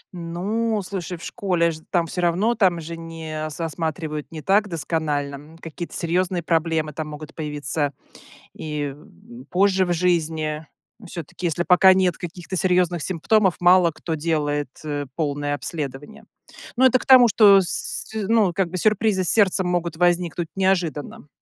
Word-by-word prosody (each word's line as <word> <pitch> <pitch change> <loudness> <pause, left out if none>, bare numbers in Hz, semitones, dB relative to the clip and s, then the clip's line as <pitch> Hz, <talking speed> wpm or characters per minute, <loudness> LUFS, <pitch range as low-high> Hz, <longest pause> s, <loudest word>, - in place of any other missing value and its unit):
Ну, 205 +7 -2
слушай, 180 -2 -5
в - - -13
школе 175 -4 0
ж 155 - -8
там 175 -2 +1
всё 180 +2 -4
равно, 185 +7 +2
там 185 -6 +2
же 165 +1 -7
не 160 -2 -6
со 165 +3 -4
осматривают 160 -2 -4
не 155 -2 -8
так 205 +2 +3
досконально. 150 -4 -2 0.2
Н - - -16
какие-то 165 +1 -8
серьезные 175 0 -1
проблемы 160 -2 0
там 155 +1 -5
могут 150 0 -9
появиться 145 -1 -2 0.6
и, 150 -3 -4
м, 230 - -15
позже 190 0 +3
в 175 - -1
жизни. 160 -3 0 0.4
Всё-таки, 170 +1 -6
если 170 +1 -1
пока 190 +1 +6
нет 185 -2 +2
каких-то 175 +1 -7
серьезных 180 -2 +1
симптомов, 190 +3 +1
мало 180 -1 +5
кто 160 +1 -5
делает, 145 -3 -1
э, 145 -1 -3
полное 145 -2 -1
обследование. 145 - -6 0.5
Ну 260 - +4
это 255 0 +5
к - - -10
тому, 255 -2 +8
что 205 -2 +6
с 185 - -3
с 215 -2 -3
ну, 220 -6 +3
как 190 -1 0
бы 185 - -4
сюрпризы 210 -1 +2
с - - -1
сердцем 195 -3 +3
могут 170 -2 -1
возникнуть 175 -1 +1
неожиданно. 175 -7 -1
170 Hz, 160 wpm, -22 LUFS, 155-185 Hz, 0.6 s, тому